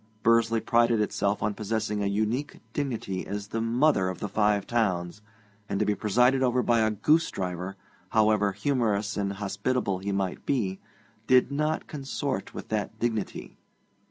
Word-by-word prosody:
Bursley 115 0 +4
prided 115 +1 +3
itself 105 -1 0
on 105 0 +1
possessing 105 -1 -2
a 100 - 0
unique 110 +8 -1
dignity 115 -10 -3
as 100 0 -5
the 115 - -2
'Mother 115 -3 +2
of 95 - -5
the 105 - -3
Five 105 0 +1
Towns,' 95 -5 -1 0.5
and 100 - -1
to - - +2
be 105 - +2
presided 125 +6 +3
over 125 -1 +2
by 120 -1 +3
a 110 -1 +3
goosedriver, 95 - 0 0.3
however 105 -2 +3
humorous 105 -3 0
and 100 -1 -1
hospitable 100 +1 -1
he 100 +2 -3
might 95 -2 -2
be, 100 -9 -1 0.5
did 130 +1 +5
not 150 +2 -1
consort 140 -5 -4
with - - -8
that 110 0 -2
dignity. 110 -3 -3
110 Hz, 155 wpm, -27 LUFS, 100-120 Hz, 0.5 s, did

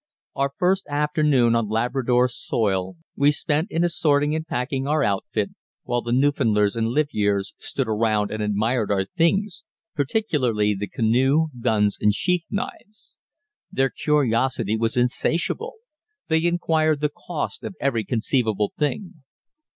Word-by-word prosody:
Our 140 0 0
first 190 +2 +1
afternoon 145 -4 +2
on 115 -3 0
Labrador 125 +2 +1
soil 95 -6 -2 0.2
we 145 +1 +4
spent 150 +2 -1
in 165 +2 0
assorting 150 -4 +2
and 160 +1 -3
packing 130 +1 -2
our 150 -1 +2
outfit, 100 -4 -1 0.3
while 120 0 -1
the 120 - -4
Newfoundlanders 120 -6 +2
and 115 -1 0
livyeres 105 -7 0
stood 135 -3 -2
around 110 -1 +1
and 110 - -3
admired 105 +2 0
our 95 -1 +1
things, 190 - 0 0.3
particularly 130 - +1
the 100 +1 -4
canoe, 130 +10 +2
guns, 105 -4 +1
and 105 -1 +3
sheath 180 +2 0
knives. 210 +1 -7 0.5
Their 135 0 +1
curiosity 130 -6 +1
was 115 +1 -1
insatiable; 165 - 0 0.5
they 160 +1 +2
inquired 160 -3 +1
the 150 - +2
cost 175 -4 -5
of - - -6
every 120 -5 0
conceivable 110 -2 0
thing. 155 +3 -2
130 Hz, 135 wpm, -23 LUFS, 110-155 Hz, 0.5 s, we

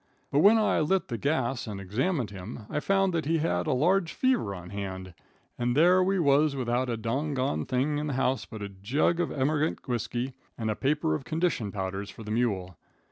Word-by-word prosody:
But 140 - +3
when 205 +7 +7
I 215 - +2
lit 170 +4 +1
the 120 - -2
gas 130 -2 0
and 105 -2 -5
examined 115 - -1
him, 105 +3 -8
I 150 - 0
found 195 +3 +2
that 165 -3 -1
he 165 +1 +2
had 120 - 0
a - - +2
large 170 +7 +2
fever 255 - +1
on 90 -1 -9
hand, 95 -2 -5 0.5
and 120 +2 0
there 180 +4 +6
we 195 +1 +1
was 145 -2 +3
without 125 0 0
a 115 - -1
doggon 130 - -1
thing 140 +4 0
in 150 - -2
the 145 - -2
house 130 0 0
but 110 -3 -8
a 100 - -4
jug 120 - 0
of 175 - 0
emigrant 150 +3 0
whiskey 120 +1 -2 0.2
and 110 -2 -1
a - - -2
paper 140 - +1
of 80 - -2
condition 160 - -1
powders 95 0 -4
fur 110 - -10
the 105 - -6
mule. 100 -7 -1
130 Hz, 205 wpm, -28 LUFS, 105-155 Hz, 0.5 s, when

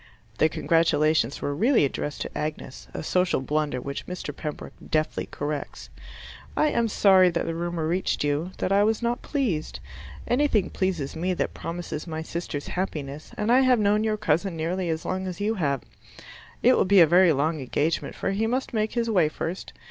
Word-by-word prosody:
(The 155 - +4
congratulations 155 -5 +2
were 145 - -1
really 225 - +3
addressed 145 +1 -4
to - - -5
Agnes 150 -3 -5
a - - -5
social 180 0 +1
blunder 145 0 -1
which 140 +3 -6
Mr. 180 -5 -6
Pembroke 150 0 -6 0.2
deftly 155 0 0
corrects.) 145 0 -5 0.7
I 305 - +4
am 235 -5 +1
sorry 190 -3 +5
that 170 -1 -2
the 165 - -2
rumor 170 -1 -2
reached 180 -1 0
you 145 +4 0
that 185 - -1
I 200 +1 +5
was 220 +2 +1
not 240 +1 0
pleased. 225 - -2 0.5
Anything 245 -5 +2
pleases 175 -8 -2
me 180 +3 -1
that - - -2
promises 170 -2 -5
my 160 -1 -4
sister's 160 -3 -5
happiness, 150 -5 -4
and 210 +2 0
I 250 - +6
have 255 -2 +4
known 210 0 +2
your 215 -1 0
cousin 175 -2 0
nearly 175 +3 -2
as 160 0 -2
long 190 0 -2
as 180 -2 -6
you 210 +2 0
have. 140 - -1 0.8
It - - +6
will - - +3
be 200 +1 +5
a - - +9
very 175 +2 +5
long 155 +2 0
engagement, 145 +5 -1
for - - -2
he 215 +3 0
must 255 +2 -2
make 215 -1 0
his 235 -1 0
way 185 -9 +3
first. 170 +4 -5
175 Hz, 185 wpm, -25 LUFS, 155-205 Hz, 0.8 s, a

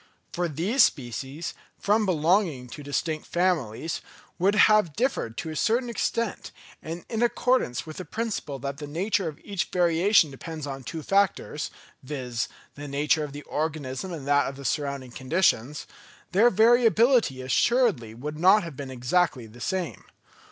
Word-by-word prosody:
For 175 0 0
these 180 - +3
species, 135 +4 -2 0.2
from 210 +1 +2
belonging 165 -4 +2
to 145 - -9
distinct 155 +2 -3
families, 165 -6 -1 0.4
would 195 +4 +3
have 210 -6 +5
differed 205 - -1
to 160 - -4
a - - -6
certain 235 +6 +1
extent, 230 -1 -2 0.3
and 165 +2 -7
in 225 -1 -3
accordance 240 - +1
with 155 -1 -9
the 185 - -5
principle 210 -7 -3
that 140 +1 -5
the 145 -1 -7
nature 190 +5 0
of 155 -1 -6
each 195 -2 -2
variation 175 -1 +3
depends 155 +2 -7
on 135 -2 -6
two 160 +5 -6
factors, 195 -6 +1 0.3
viz., 130 -4 -3 0.3
the 145 +1 -8
nature 150 +3 +1
of 150 - -5
the 145 +1 -8
organism 155 +1 -3
and 155 -6 -6
that 145 0 +3
of 135 - -5
the 140 0 -10
surrounding 140 -4 -2
conditions, 140 -1 0 0.5
their 210 +7 +5
variability 230 - +4
assuredly 135 - +2
would 150 +5 -6
not 190 +4 +6
have 165 -4 -7
been 135 0 -6
exactly 130 +1 0
the 115 +2 -14
same. 185 +4 -3
160 Hz, 155 wpm, -26 LUFS, 140-195 Hz, 0.5 s, not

